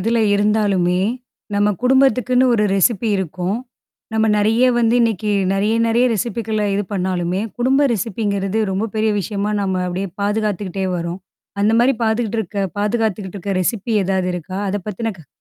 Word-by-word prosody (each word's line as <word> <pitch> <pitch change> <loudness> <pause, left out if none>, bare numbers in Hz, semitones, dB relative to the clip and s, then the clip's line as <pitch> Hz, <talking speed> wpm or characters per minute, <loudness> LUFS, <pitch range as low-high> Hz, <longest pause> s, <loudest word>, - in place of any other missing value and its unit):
இதுல 230 +4 +1
இருந்தாலுமே, 200 -4 +2 0.6
நம்ம 205 +1 +3
குடும்பத்துக்குன்னு 255 -1 +3
ஒரு 210 -2 +2
ரெசிப்பி 205 +3 +2
இருக்கும். 185 +2 -2 0.6
நம்ம 220 0 +2
நிறைய 220 +4 +3
வந்து 230 0 +3
இன்னக்கி 220 -3 0 0.2
நிறைய, 205 +3 +1
நிறைய 230 +2 +3
ரெசிபிக்குள்ள 220 0 -2
இது 205 - 0
பண்ணாலுமே, 185 -1 -1 0.2
குடும்ப 270 +3 +3
ரெசிபிங்கிறது 200 0 -1
ரொம்ப 195 +4 -1
பெரிய 215 0 +2
விஷயமா 205 +1 -2
நம்ம 190 -2 -1
அப்பிடியே 180 +1 -3
பாதுகாத்துக்கிட்டே 205 -2 -1
வரோம். 170 +1 -4 0.4
அந்தமாரி 230 +5 +3
பாத்துக்கிட்டு 220 0 0
இருக்க 215 -1 -5 0.2
பாதுகாத்துக்கிட்டு 210 -2 -1
இருக்க 195 +1 -3
ரெசிபி 225 +4 -1
ஏதாவது 185 -1 0
இருக்கா? 180 +2 -6
அதப் 200 0 -3
பத்தின 215 +1 -3
க 160 - -15
210 Hz, 140 wpm, -19 LUFS, 190-225 Hz, 0.6 s, நம்ம